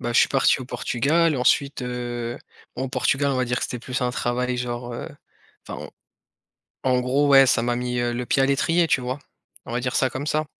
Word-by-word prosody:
bah, 120 - -2
je - - +4
suis - - +5
parti 135 -1 +3
au - - -5
Portugal 140 +6 +1
ensuite, 135 +2 +1
heu 120 0 -4 0.4
bon 130 +1 -2
Portugal 140 +1 +1
on 130 - 0
va 130 - +1
dire 125 0 -1
que - - -5
c'était 125 - -5
plus 130 +2 -4
un 125 - +1
travail 125 +1 -1
genre, 120 0 -4
heu, 120 - -6 0.6
enfin - - -7
en - - -10 0.9
en 130 -1 +2
gros 135 +3 +2
ouais 135 -1 +7
ça 115 - +3
m'a 120 0 0
mis, 125 0 -2
heu, 120 0 0
le 125 +1 -3
pied 135 - +2
à - - +5
l'étrier 165 +5 +2
tu 135 - +2
vois? 125 +3 -4 0.5
On - - -8
va 120 - 0
dire 125 +1 -2
ça 130 - +2
comme 140 +3 -5
ça. 155 0 0
125 Hz, 230 wpm, -23 LUFS, 120-135 Hz, 0.9 s, ouais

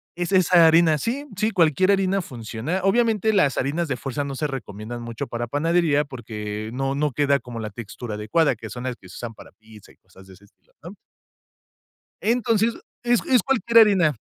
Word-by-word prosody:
es 175 +2 -3
esa 180 -2 +5
harina 160 -1 +5
sí, 265 - -3
sí, 215 +1 +1
cualquier 180 0 +3
harina 195 -1 +1
funciona. 120 +6 -4
Obviamente, 220 +1 +2
las 150 -9 +3
harinas 155 +5 -1
de 135 - -2
fuerza 135 +3 -4
no 140 -1 -5
se 150 +3 -2
recomiendan 120 -3 -7
mucho 115 -1 -5
para 120 0 -4
panadería, 150 +2 +1
porque, 110 -4 -6
no 135 +1 -2
no 150 0 0
queda 140 +1 +2
como 120 -2 -8
la 110 - -4
textura 110 +1 -7
adecuada, 120 +7 +1
que 110 0 -10
son 120 0 -7
las 130 -1 -3
que 95 -5 -17
se - - -12
usan 115 -2 -7
para - - -14
pizza 110 -2 -17
y - - -23
cosas 95 +1 -19
de 95 - -15
ese 100 +3 -19
estilo, 100 - -32
¿no? 175 +6 -10 1.3
Entonces, 230 -1 +1 0.3
es 240 -1 +3
es 255 -2 +4
cualquier 235 -3 +3
harina, 190 - +4
145 Hz, 195 wpm, -23 LUFS, 115-190 Hz, 1.3 s, esa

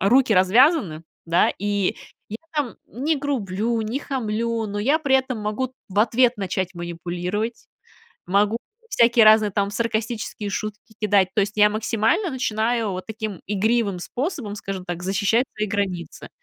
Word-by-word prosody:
руки 245 +5 +4
развязаны, 190 - +4 0.2
да, 170 +1 +3
и 205 -1 0 0.3
я 215 - -5 0.2
там 290 -6 -1
не 295 +7 -1
грублю, 230 -5 -1
не 225 +5 -2
хамлю, 230 -4 -2
но 205 0 -4
я 275 +10 +2
при 275 -3 +4
этом 260 -2 -2
могу 215 +5 -2 0.2
в 200 +1 -3
ответ 240 +2 +3
начать 190 -2 -2
манипулировать, 175 +6 -4 0.6
могу 205 +4 +2 0.3
всякие 235 -1 +5
разные 215 -1 +6
там 200 +1 0
саркастические 220 -1 -3
шутки 215 +2 -5
кидать. 205 -3 +3
То - - +3
есть, 200 +1 -1
я 210 0 +6
максимально 225 - 0
начинаю 230 -3 0
вот 185 0 -6
таким 215 -4 -5
игривым 210 -1 +1
способом, 245 - -4
скажем 195 -2 -5
так, 175 -1 -5
защищать 200 +6 +1
свои 215 0 -1
границы. 190 -4 -3
215 Hz, 145 wpm, -23 LUFS, 195-235 Hz, 0.6 s, разные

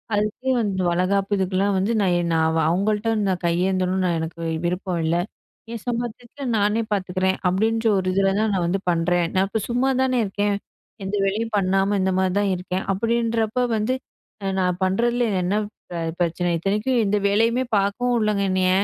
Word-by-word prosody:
அதுக்கு 215 +5 -1
வந்து 195 -4 -1
வளைகாப்பு 195 +3 +1
இதுக்குலாம் 190 +1 +1
வந்து, 195 +5 +1
"நான் 185 -3 +2
என் 170 -1 -1
நான் 160 0 +2
அவுங்கள்ட்ட 210 +5 0 0.2
நான் 185 -1 -1
கையேந்தணும்னு 185 +2 +1
நான் 170 -2 +1
எனக்கு 165 +1 -5 0.2
விருப்பம் 180 0 -2
இல்ல. 165 - +1 0.6
என் 230 - -6
சம்பாத்தியத்துல 240 +3 -4
நானே 210 +2 +2
பாத்துக்குறேன்" 190 -1 0
அப்படின்ற 225 +5 +1
ஒரு 185 0 -1
இதில 195 0 +3
தான் 215 -1 +1
நான் 180 -2 0
வந்து 190 +3 0
பண்றேன். 175 +1 +1
நான் 190 +1 +3
இப்போ 220 +2 -2
சும்மா 250 +3 +2
தானே 255 -1 +1
இருக்கேன். 205 +1 0 0.5
எந்த 195 +2 -2
வேலையும் 215 +3 -1
பண்ணாம 195 +1 +2
இந்த 190 - +1
மாதிரி 190 -1 +1
தான் 200 -1 +1
இருக்கேன். 180 +1 -3
அப்படின்றப்போ 230 +2 0
வந்து, 220 +4 0 0.5
அ - - -3
நான் 180 -1 0
பண்ணுறதுல 235 +5 +1 0.2
என்ன 185 - 0 0.7
பிரச்சனை? 175 +1 0
இத்தனைக்கும் 210 +8 0
எந்த 205 +1 +1
வேலையுமே 230 +5 +2
பாக்கவும் 205 +5 +1
உடலைங்க 210 -3 +1
என்னய. 185 0 +2
195 Hz, 160 wpm, -23 LUFS, 185-220 Hz, 0.7 s, இதில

